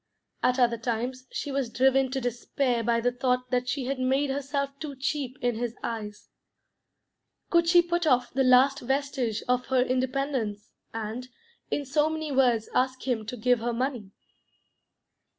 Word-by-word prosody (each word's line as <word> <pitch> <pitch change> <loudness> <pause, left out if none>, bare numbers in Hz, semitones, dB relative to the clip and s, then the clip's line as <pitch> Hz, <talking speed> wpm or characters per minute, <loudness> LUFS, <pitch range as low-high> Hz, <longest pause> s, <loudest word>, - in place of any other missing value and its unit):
At 250 - +2
other 235 -2 +2
times 245 +2 -3
she 285 - -4
was 270 -3 -1
driven 265 +2 +3
to 265 +1 -2
despair 245 0 -1
by 230 0 +1
the 245 +1 +2
thought 250 0 -1
that 250 0 0
she 270 -2 -2
had 270 +1 -2
made 270 +2 +1
herself 280 0 -2
too 290 -2 -6
cheap 265 -1 -3
in 245 0 +2
his 240 0 -3
eyes. 210 -2 -5 1.2
Could 340 -1 +4
she 350 0 +6
put 345 -1 0
off 250 -3 +2
the 265 +1 +2
last 260 +2 +5
vestige 265 -4 -1
of 250 0 +1
her 260 -1 +3
independence, 255 -4 -2 0.2
and, 225 +3 -5 0.4
in 290 - -1
so 295 +3 +2
many 315 -1 -3
words, 245 -5 +3
ask 260 +1 0
him 225 -4 -1
to 250 - -5
give 245 +2 +2
her 235 +1 -2
money? 245 -4 -2
255 Hz, 165 wpm, -27 LUFS, 240-275 Hz, 1.2 s, she